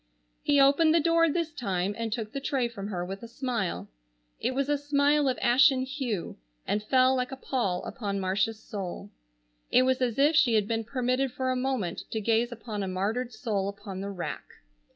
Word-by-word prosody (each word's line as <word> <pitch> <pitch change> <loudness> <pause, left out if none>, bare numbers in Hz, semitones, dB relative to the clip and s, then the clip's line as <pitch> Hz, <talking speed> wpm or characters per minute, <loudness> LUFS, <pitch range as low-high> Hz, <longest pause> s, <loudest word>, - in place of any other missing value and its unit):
He 285 -1 +3
opened 300 +4 +5
the - - +5
door 330 +1 +3
this 330 +1 -1
time 195 -7 -1
and 230 0 -3
took 220 -1 -3
the 275 - -3
tray 265 -3 0
from 205 -4 -7
her 180 -4 -3
with 195 +2 -6
a 235 - -8
smile. 230 - -3 0.5
It 255 - -1
was 275 0 0
a 290 - +2
smile 285 0 +2
of 255 - -1
ashen 260 +2 +5
hue, 260 - -4 0.3
and 210 - 0
fell 255 +4 +3
like 250 0 -1
a - - -4
pall 220 -10 -1
upon 200 -5 -3
Marcia's 195 +4 0
soul. 200 -1 -6 0.6
It 255 - +5
was 260 0 +1
as 240 -3 0
if 290 +3 +4
she 245 -7 +5
had 210 -2 +2
been 225 0 -1
permitted 255 +2 0
for 260 +1 -1
a - - 0
moment 250 -9 -2
to 220 - -2
gaze 230 +3 +1
upon 220 -3 -5
a 195 - -2
martyred 210 +7 -2
soul 210 -3 -2
upon 200 -1 -7
the 200 - -4
rack. 185 -3 -5
240 Hz, 200 wpm, -28 LUFS, 205-270 Hz, 0.6 s, opened